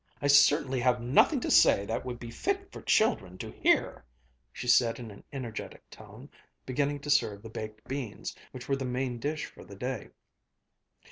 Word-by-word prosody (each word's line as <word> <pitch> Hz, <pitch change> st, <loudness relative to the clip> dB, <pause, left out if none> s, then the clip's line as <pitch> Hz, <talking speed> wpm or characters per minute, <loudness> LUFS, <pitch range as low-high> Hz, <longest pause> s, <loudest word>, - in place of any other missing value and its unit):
"I -, -, -4 dB
certainly 145 Hz, -1 st, +5 dB
have 125 Hz, 0 st, +2 dB
nothing 130 Hz, -, +4 dB
to -, -, -2 dB
say 100 Hz, -, +5 dB
that 115 Hz, -, -3 dB
would 125 Hz, -2 st, -5 dB
be 115 Hz, -1 st, -8 dB
fit 390 Hz, -, -2 dB
for -, -, -9 dB
children 95 Hz, -, +1 dB
to -, -, -7 dB
hear!" -, -, +1 dB, 0.5 s
she 125 Hz, -, -7 dB
said 120 Hz, -1 st, +4 dB
in 115 Hz, -3 st, -8 dB
an 100 Hz, -, -14 dB
energetic 125 Hz, -6 st, -7 dB
tone, -, -, -13 dB, 0.3 s
beginning 145 Hz, +2 st, -1 dB
to 145 Hz, -, -2 dB
serve 105 Hz, -8 st, +2 dB
the 115 Hz, -, -8 dB
baked 110 Hz, 0 st, -8 dB
beans, 135 Hz, -5 st, -5 dB, 0.2 s
which 130 Hz, -1 st, -9 dB
were 135 Hz, -, +1 dB
the 135 Hz, -, -4 dB
main 125 Hz, -1 st, -2 dB
dish 150 Hz, +4 st, -2 dB
for -, -, -13 dB
the 100 Hz, -, -12 dB
day. 125 Hz, +2 st, -4 dB
125 Hz, 185 wpm, -29 LUFS, 115-140 Hz, 0.5 s, certainly